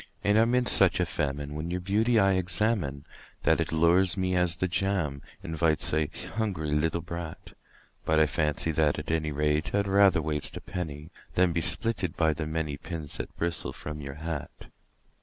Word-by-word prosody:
And 105 Hz, +1 st, +3 dB
I -, -, +6 dB
am 115 Hz, +2 st, +2 dB
in 125 Hz, 0 st, +2 dB
such -, -, +6 dB
a -, -, +2 dB
famine 70 Hz, 0 st, -3 dB
when 75 Hz, +3 st, -4 dB
your 90 Hz, +1 st, -2 dB
beauty 110 Hz, +6 st, +1 dB
I 95 Hz, -2 st, +4 dB
examine 90 Hz, -5 st, 0 dB, 0.4 s
That -, -, +3 dB
it -, -, -2 dB
lures 85 Hz, +3 st, +3 dB
me 95 Hz, -1 st, 0 dB
as 90 Hz, -1 st, +2 dB
the 95 Hz, -, 0 dB
jam 90 Hz, -7 st, -1 dB, 0.2 s
invites 80 Hz, -1 st, 0 dB
a 75 Hz, -1 st, +1 dB, 0.3 s
hungry 95 Hz, -9 st, -2 dB
little 80 Hz, +3 st, 0 dB
brat; 85 Hz, -1 st, -8 dB, 0.5 s
But 80 Hz, 0 st, +2 dB
I 80 Hz, -, +5 dB
fancy 75 Hz, 0 st, 0 dB
that, 75 Hz, -1 st, +1 dB
at 75 Hz, +1 st, -4 dB
any 80 Hz, -1 st, -1 dB
rate, 75 Hz, +3 st, 0 dB
I'd 100 Hz, 0 st, +1 dB
rather 100 Hz, -3 st, +4 dB
waste 75 Hz, -2 st, -2 dB
a -, -, -7 dB
penny 80 Hz, -2 st, -6 dB, 0.2 s
Than 90 Hz, -2 st, +3 dB
be 85 Hz, -, 0 dB
spitted 100 Hz, -2 st, +1 dB
by 80 Hz, -2 st, +2 dB
the 75 Hz, 0 st, -4 dB
many 80 Hz, -2 st, -3 dB
pins 80 Hz, -2 st, -6 dB
that -, -, -7 dB
bristle 85 Hz, 0 st, -1 dB
from 75 Hz, 0 st, -7 dB
your 70 Hz, -1 st, -7 dB
hat. 80 Hz, -1 st, -7 dB
80 Hz, 190 wpm, -28 LUFS, 75-95 Hz, 0.5 s, I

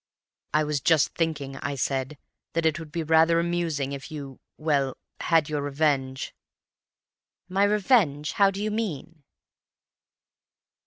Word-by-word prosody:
"'I 155 Hz, -, +4 dB
was 150 Hz, -2 st, -1 dB
just 160 Hz, -4 st, +4 dB
thinking,' 150 Hz, -5 st, -2 dB
I 140 Hz, +1 st, -3 dB
said, 135 Hz, +1 st, -2 dB, 0.4 s
'that 165 Hz, 0 st, 0 dB
it 160 Hz, +1 st, +2 dB
would 160 Hz, -2 st, -9 dB
be 165 Hz, +1 st, -2 dB
rather 160 Hz, +1 st, +4 dB
amusing 170 Hz, -5 st, -1 dB
if 140 Hz, +2 st, -6 dB
you—well, 140 Hz, -1 st, -3 dB, 0.2 s
had 165 Hz, -3 st, +3 dB
your 150 Hz, -1 st, -2 dB
revenge." 140 Hz, -2 st, 0 dB, 1.1 s
"'My 195 Hz, +2 st, +2 dB
revenge? 200 Hz, -, +2 dB
How 200 Hz, -1 st, +4 dB
do 195 Hz, +1 st, -4 dB
you 215 Hz, -, -1 dB
mean? 170 Hz, -7 st, -4 dB
155 Hz, 125 wpm, -26 LUFS, 140-170 Hz, 1.1 s, I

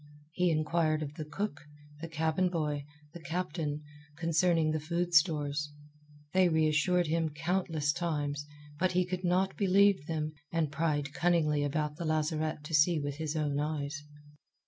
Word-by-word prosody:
He 180 Hz, +2 st, +1 dB
inquired 155 Hz, 0 st, +1 dB
of 145 Hz, -1 st, -6 dB
the 155 Hz, 0 st, -6 dB
cook, 195 Hz, +1 st, -4 dB, 0.4 s
the 165 Hz, -, -4 dB
cabin 160 Hz, +3 st, +1 dB
boy, 150 Hz, -4 st, -2 dB, 0.3 s
the 175 Hz, -, -8 dB
captain, 155 Hz, -2 st, -3 dB, 0.3 s
concerning 165 Hz, -1 st, +2 dB
the 155 Hz, -, 0 dB
food 170 Hz, +3 st, -2 dB
stores. 150 Hz, -2 st, +2 dB, 0.6 s
They 185 Hz, -1 st, +5 dB
reassured 160 Hz, +3 st, +2 dB
him 160 Hz, 0 st, 0 dB
countless 160 Hz, -1 st, 0 dB
times; 145 Hz, -4 st, -2 dB, 0.3 s
but 185 Hz, +1 st, +2 dB
he 180 Hz, 0 st, +2 dB
could 180 Hz, +1 st, -4 dB
not 185 Hz, +2 st, +1 dB
believe 195 Hz, -4 st, +3 dB
them, 155 Hz, -1 st, -2 dB, 0.2 s
and 165 Hz, -3 st, 0 dB
pried 145 Hz, -2 st, -1 dB
cunningly 155 Hz, -4 st, +2 dB
about 150 Hz, +1 st, -1 dB
the 170 Hz, -, -4 dB
lazarette 155 Hz, 0 st, -1 dB
to 150 Hz, -, -8 dB
see 155 Hz, +2 st, +4 dB
with 145 Hz, -1 st, -4 dB
his 155 Hz, 0 st, -3 dB
own 145 Hz, -2 st, 0 dB
eyes. 145 Hz, -1 st, -3 dB
155 Hz, 150 wpm, -31 LUFS, 150-175 Hz, 0.6 s, They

